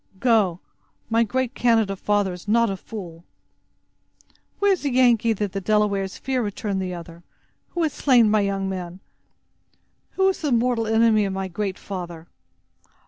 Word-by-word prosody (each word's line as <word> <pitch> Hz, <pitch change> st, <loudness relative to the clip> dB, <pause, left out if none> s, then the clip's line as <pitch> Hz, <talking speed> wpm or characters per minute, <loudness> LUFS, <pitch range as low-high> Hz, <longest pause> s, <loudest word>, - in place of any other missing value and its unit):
Go! 210 Hz, -8 st, +2 dB, 0.5 s
my 230 Hz, +1 st, +4 dB
great 255 Hz, +3 st, -2 dB
Canada 225 Hz, -6 st, +2 dB
father 205 Hz, -1 st, 0 dB
is 180 Hz, +2 st, -11 dB
not 230 Hz, 0 st, +3 dB
a -, -, -2 dB
fool!" 175 Hz, -4 st, -9 dB, 1.3 s
"Where 405 Hz, 0 st, +3 dB
is 375 Hz, -, +1 dB
the 285 Hz, -, -1 dB
Yengee 240 Hz, -3 st, +3 dB
that 205 Hz, -2 st, -2 dB
the 195 Hz, 0 st, -4 dB
Delawares 200 Hz, -1 st, 0 dB
fear?" 260 Hz, -1 st, -1 dB
returned 205 Hz, -2 st, -3 dB
the 185 Hz, -1 st, -3 dB
other; 170 Hz, -1 st, -9 dB, 0.5 s
"who 345 Hz, -, -2 dB
has 315 Hz, -, 0 dB
slain 245 Hz, -5 st, +4 dB
my 210 Hz, 0 st, +3 dB
young 195 Hz, -1 st, -1 dB
men? 180 Hz, -1 st, -5 dB, 1.1 s
Who 385 Hz, 0 st, +2 dB
is 380 Hz, -, -3 dB
the 300 Hz, -4 st, -1 dB
mortal 235 Hz, -1 st, +1 dB
enemy 220 Hz, -1 st, +3 dB
of 195 Hz, -, -3 dB
my 190 Hz, 0 st, -3 dB
Great 195 Hz, +1 st, -3 dB
Father?" 175 Hz, -4 st, -7 dB
210 Hz, 160 wpm, -23 LUFS, 190-235 Hz, 1.3 s, my